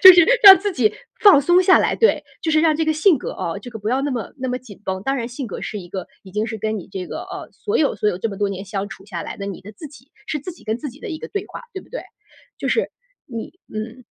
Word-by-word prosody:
就 375 0 +12
是 350 -2 +7 0.2
让 385 -1 +13
自 410 +1 -1
己 220 - +2 0.3
放 400 -9 +8
松 350 +6 +5
下 370 0 +6
来， - - +1
对。 455 - +3 0.2
就 325 - -1
是 310 - +5
让 315 -2 +4
这 320 - +1
个 315 - +2
性 310 -1 +4
格 - - -5
啊， 170 +3 -4
这 225 - -10
个 220 - -7
不 210 - -3
要 255 +3 +1
那 285 - -1
么 235 -4 -4
那 260 0 -3
么 250 - -1
紧 210 -6 -13
绷。 190 0 -3
当 270 +5 0
然 235 -3 -2
性 250 +2 -6
格 - - -6
是 210 - -4
一 175 - -11
个 190 +1 -5 0.2
已 190 - -13
经 210 +3 -1
是 220 -1 -4
跟 215 +1 -2
你 190 - -10
这 185 -2 -5
个， - - -5
呃， - - -8
所 420 +2 -2
有， 295 - +2
所 210 - +1
有 185 - -1
这 225 - -1
么 200 - -6
多 205 0 0
年 195 0 -5
相 200 0 -4
处 195 -3 -11
下 175 -4 -5
来 - - -6
的， 200 - -6
你 195 - -6
的 205 +3 -11
自 300 +9 -10
己 270 0 -18 0.2
是 300 - -1
自 330 +6 -7
己 335 - -18
跟 220 +1 -1
自 290 - -5
己 275 +3 -13
的 - - -6
一 315 - -4
个 - - -7
对 405 -1 -3
话， - - -8
对 380 - -5
不 - - -21
对？ - - -5 0.6
就 - - -2
是， 460 - +1 0.4
你 230 +5 -7 0.2
嗯。 230 +3 -6
245 Hz, 330 characters per minute, -21 LUFS, 205-315 Hz, 0.6 s, 让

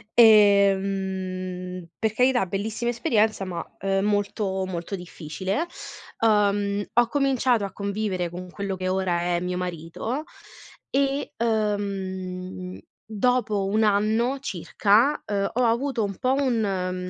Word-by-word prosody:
Ehm, 190 -4 +3
per 220 -2 0
carità 250 -1 +3
bellissima 210 +6 -2
esperienza, 225 -5 +1
ma 180 -2 -4 0.4
molto, 205 -1 0
molto 180 +1 -4
difficile, 180 - -4 0.5
ehm, 205 -2 +2
ho 240 0 +4
cominciato 255 -4 +2
a 195 - -6
convivere 200 -3 -2
con 180 +1 -8
quello 195 +1 -4
che 185 0 -3
ora 185 -2 0 0.2
è - - +1
mio 180 0 -2
marito 180 - -4 0.7
e, 275 +1 0
ehm, 190 -4 -2 0.3
dopo 220 -2 +1
un 215 +2 +2
anno 220 +5 +2
circa, 220 - +2
ehm, 200 -1 -1
ho 250 +2 +1
avuto 235 +1 +1
un 200 -2 -3
po' 255 0 +1
un 195 -9 -1
200 Hz, 115 wpm, -25 LUFS, 185-225 Hz, 0.7 s, ho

